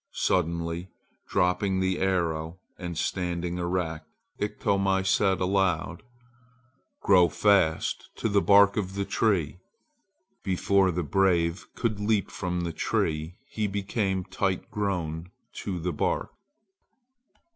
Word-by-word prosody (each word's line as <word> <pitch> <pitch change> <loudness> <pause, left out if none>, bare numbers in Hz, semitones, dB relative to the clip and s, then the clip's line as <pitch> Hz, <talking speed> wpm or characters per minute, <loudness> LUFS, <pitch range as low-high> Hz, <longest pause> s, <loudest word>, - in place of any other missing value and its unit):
Suddenly 85 0 -1 0.4
dropping 95 +1 +1
the 95 0 0
arrow 85 -3 -1 0.2
and 85 -2 -5
standing 90 -1 -2
erect, 85 -3 -2 0.3
Iktomi 100 -2 0
said 95 0 +2
aloud: 90 -4 0 1.0
"Grow 90 -3 +5
fast 95 -2 +2
to - - -1
the 100 -2 +3
bark 100 +1 +5
of 95 -2 -2
the 100 0 -1
tree!" 90 -8 0 0.8
Before 95 +1 +2
the 90 0 -1
brave 85 +1 +1
could 110 -4 -1
leap 105 -1 0
from 90 -2 -3
the 85 -1 -3
tree 80 +3 -1
he 110 -1 -1
became 95 -1 -1
tight 95 +2 -2
grown 90 -6 -2 0.3
to 95 -3 -3
the 85 +1 -2
bark. - - -1
95 Hz, 115 wpm, -27 LUFS, 85-100 Hz, 1.0 s, Grow